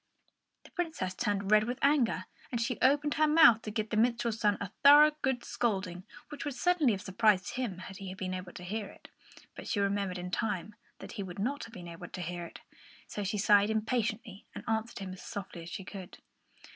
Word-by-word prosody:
The -, -, -17 dB
Princess 320 Hz, -, -3 dB
turned 200 Hz, +1 st, -1 dB
red 215 Hz, 0 st, +6 dB
with 245 Hz, +2 st, -3 dB
anger, 265 Hz, -10 st, +3 dB, 0.3 s
and 240 Hz, -, -1 dB
she 235 Hz, +1 st, -1 dB
opened 290 Hz, +3 st, +3 dB
her 310 Hz, 0 st, +3 dB
mouth 300 Hz, -8 st, +7 dB
to 215 Hz, -, -6 dB
give 215 Hz, 0 st, -3 dB
the 215 Hz, -, 0 dB
minstrel's 235 Hz, -1 st, +1 dB
son 205 Hz, -3 st, +2 dB
a 200 Hz, -2 st, -5 dB
thorough 295 Hz, +2 st, +9 dB
good 265 Hz, -3 st, 0 dB
scolding, 190 Hz, -5 st, -2 dB, 0.2 s
which 295 Hz, -, -6 dB
would 290 Hz, -4 st, -4 dB
certainly 305 Hz, -2 st, +3 dB
have 195 Hz, -, -5 dB
surprised 190 Hz, -1 st, +2 dB
him 245 Hz, -8 st, -3 dB
had 190 Hz, +1 st, -9 dB
he 195 Hz, -2 st, -7 dB
been 185 Hz, -1 st, -4 dB
able 185 Hz, -1 st, -6 dB
to 180 Hz, -, -9 dB
hear 205 Hz, +3 st, -3 dB
it. -, -, -15 dB, 0.5 s
But -, -, -8 dB
she 205 Hz, -, 0 dB
remembered 200 Hz, -2 st, 0 dB
in 180 Hz, 0 st, -6 dB
time 210 Hz, 0 st, -2 dB, 0.2 s
that -, -, -10 dB
he 215 Hz, -, -5 dB
would 190 Hz, -1 st, -7 dB
not 260 Hz, +8 st, -3 dB
be 175 Hz, -1 st, -9 dB
able 170 Hz, +1 st, -8 dB
to 180 Hz, -, -6 dB
hear 175 Hz, 0 st, -4 dB
it, -, -, -12 dB, 0.4 s
so 205 Hz, -, -5 dB
she 200 Hz, +2 st, -2 dB
sighed 205 Hz, 0 st, +5 dB
impatiently 220 Hz, -2 st, -2 dB
and -, -, -7 dB
answered 220 Hz, +1 st, -1 dB
him 190 Hz, -2 st, -6 dB
as 185 Hz, -, -11 dB
softly 190 Hz, -3 st, -7 dB
as 165 Hz, -, -9 dB
she 190 Hz, -, -6 dB
could. 185 Hz, -1 st, -9 dB
210 Hz, 210 wpm, -31 LUFS, 185-240 Hz, 0.5 s, thorough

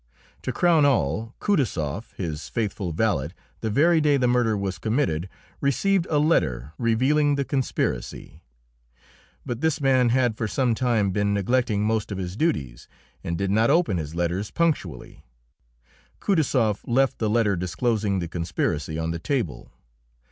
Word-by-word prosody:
To -, -, -3 dB
crown 170 Hz, -4 st, +3 dB
all, 115 Hz, -, +1 dB
Kutaisoff, 110 Hz, -, -1 dB
his 80 Hz, -4 st, -5 dB
faithful 100 Hz, -5 st, -2 dB
valet, 80 Hz, -6 st, 0 dB, 0.3 s
the 110 Hz, -, -2 dB
very 160 Hz, +8 st, +4 dB
day 145 Hz, -2 st, +3 dB
the 130 Hz, -, +1 dB
murder 120 Hz, -3 st, +2 dB
was 95 Hz, -3 st, -3 dB
committed 95 Hz, -, -1 dB, 0.3 s
received 175 Hz, +7 st, +1 dB
a 150 Hz, -, +2 dB
letter 75 Hz, -, +1 dB
revealing 135 Hz, +6 st, +2 dB
the 140 Hz, -1 st, -1 dB
conspiracy; 130 Hz, -, -3 dB, 1.0 s
but 120 Hz, 0 st, -4 dB
this 160 Hz, -1 st, +1 dB
man 130 Hz, -3 st, +3 dB
had 120 Hz, -2 st, +2 dB
for 110 Hz, -, -2 dB
some 125 Hz, +3 st, +1 dB
time 115 Hz, -5 st, +1 dB
been 100 Hz, +1 st, 0 dB
neglecting 105 Hz, 0 st, +1 dB
most 110 Hz, 0 st, 0 dB
of 100 Hz, -, -3 dB
his 90 Hz, -1 st, -4 dB
duties, 70 Hz, -, -2 dB, 0.4 s
and 85 Hz, 0 st, -3 dB
did 100 Hz, 0 st, -1 dB
not 110 Hz, +3 st, +3 dB
open 165 Hz, -, +2 dB
his 80 Hz, -1 st, -5 dB
letters 85 Hz, +4 st, -1 dB
punctually. 155 Hz, -, -2 dB, 1.0 s
Kutaisoff 130 Hz, -, +1 dB
left 130 Hz, +2 st, +2 dB
the 110 Hz, -, 0 dB
letter 105 Hz, -3 st, +2 dB
disclosing 100 Hz, +3 st, -1 dB
the 85 Hz, -2 st, -2 dB
conspiracy 80 Hz, -2 st, -2 dB
on 80 Hz, 0 st, -2 dB
the 85 Hz, -, -4 dB
table. 115 Hz, -, -3 dB
110 Hz, 150 wpm, -24 LUFS, 90-135 Hz, 1.0 s, very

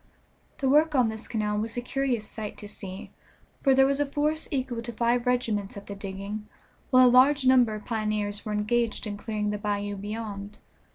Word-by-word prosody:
The 270 Hz, -, -1 dB
work 300 Hz, +3 st, +4 dB
on 250 Hz, -4 st, +4 dB
this 220 Hz, +1 st, -6 dB
canal 210 Hz, -2 st, -1 dB
was 225 Hz, +2 st, -4 dB
a -, -, +2 dB
curious 250 Hz, -4 st, -1 dB
sight 215 Hz, -2 st, -6 dB
to 205 Hz, -, -8 dB
see, 195 Hz, -2 st, -8 dB, 0.5 s
for 270 Hz, -2 st, +4 dB
there 270 Hz, 0 st, +6 dB
was 275 Hz, +1 st, +1 dB
a 290 Hz, -, +2 dB
force 300 Hz, +3 st, -1 dB
equal 255 Hz, -4 st, -2 dB
to 235 Hz, -, -5 dB
five 235 Hz, +2 st, +1 dB
regiments 220 Hz, -6 st, 0 dB
at 200 Hz, -, -9 dB
the 200 Hz, -, -6 dB
digging, 200 Hz, +2 st, -6 dB, 0.4 s
while 255 Hz, -1 st, +7 dB
a -, -, +8 dB
large 260 Hz, +3 st, +5 dB
number 250 Hz, -4 st, +5 dB
of 210 Hz, -, -9 dB
pioneers 215 Hz, -2 st, -2 dB
were 215 Hz, -, -4 dB
engaged 215 Hz, +3 st, 0 dB
in 210 Hz, -1 st, -4 dB
clearing 210 Hz, 0 st, -2 dB
the 210 Hz, -, -3 dB
bayou 205 Hz, -1 st, -2 dB
beyond. 205 Hz, 0 st, -6 dB
220 Hz, 195 wpm, -27 LUFS, 210-255 Hz, 0.5 s, a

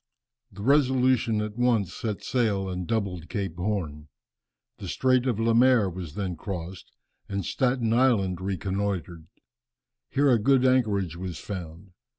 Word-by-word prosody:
The 100 Hz, +1 st, -9 dB
Resolution 130 Hz, -4 st, +3 dB
at 105 Hz, +1 st, -5 dB
once 115 Hz, -7 st, +2 dB
set 105 Hz, -3 st, -4 dB
sail 105 Hz, -6 st, 0 dB
and 90 Hz, -2 st, -4 dB
doubled 95 Hz, -7 st, -2 dB
Cape 95 Hz, -5 st, -4 dB
Horn. 90 Hz, -6 st, -3 dB, 0.7 s
The -, -, -7 dB
Strait 130 Hz, 0 st, +2 dB
of 115 Hz, -4 st, 0 dB
Lemaire 115 Hz, -2 st, +4 dB
was 85 Hz, -4 st, -7 dB
then 95 Hz, -4 st, -3 dB
crossed, 90 Hz, +1 st, -7 dB, 0.4 s
and 100 Hz, -2 st, -3 dB
Staten 125 Hz, -3 st, 0 dB
Island 110 Hz, -8 st, +2 dB
reconnoitred. 95 Hz, -3 st, -3 dB, 0.8 s
Here 140 Hz, 0 st, +3 dB
a 120 Hz, -, +4 dB
good 130 Hz, +3 st, +3 dB
anchorage 105 Hz, -10 st, +2 dB
was 90 Hz, -2 st, -5 dB
found. 90 Hz, -1 st, -8 dB
100 Hz, 135 wpm, -26 LUFS, 90-120 Hz, 0.8 s, Lemaire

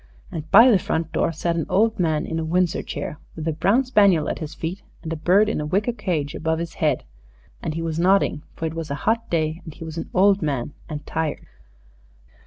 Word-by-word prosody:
And 160 Hz, -1 st, -6 dB
by 230 Hz, +8 st, +8 dB
the 200 Hz, -, +5 dB
front 160 Hz, -2 st, -2 dB
door -, -, +1 dB
sat 170 Hz, +1 st, -1 dB
an 165 Hz, -, -2 dB
old 215 Hz, +3 st, +2 dB
man 160 Hz, -2 st, +1 dB
in 160 Hz, -, -3 dB
a -, -, -2 dB
Windsor 175 Hz, +1 st, +1 dB
chair, 150 Hz, -, -5 dB, 0.2 s
with 160 Hz, 0 st, -5 dB
a 160 Hz, -, +1 dB
brown 215 Hz, -, +2 dB
spaniel 200 Hz, -, +4 dB
at -, -, -3 dB
his 155 Hz, -1 st, -6 dB
feet 175 Hz, +5 st, -4 dB, 0.2 s
and 165 Hz, -1 st, -3 dB
a -, -, -2 dB
bird 185 Hz, +7 st, +3 dB
in 215 Hz, -, -1 dB
a -, -, -3 dB
wicker 205 Hz, +8 st, 0 dB
cage 175 Hz, -10 st, -2 dB
above 160 Hz, 0 st, -1 dB
his 170 Hz, 0 st, -4 dB
head, -, -, 0 dB, 0.6 s
and 155 Hz, -, -3 dB
he 165 Hz, -, -3 dB
was 165 Hz, -1 st, -2 dB
nodding, 185 Hz, -4 st, +3 dB
for 165 Hz, -, -4 dB
it 160 Hz, -, -2 dB
was 165 Hz, -1 st, -5 dB
a 140 Hz, -, -2 dB
hot 230 Hz, +1 st, +1 dB
day, 160 Hz, 0 st, -1 dB
and 160 Hz, -4 st, -10 dB
he -, -, -9 dB
was 160 Hz, 0 st, -6 dB
an -, -, -6 dB
old 195 Hz, +1 st, +4 dB
man 145 Hz, -3 st, -2 dB, 0.2 s
and 150 Hz, -2 st, -6 dB
tired. 160 Hz, -2 st, -3 dB
165 Hz, 230 wpm, -23 LUFS, 155-195 Hz, 0.6 s, by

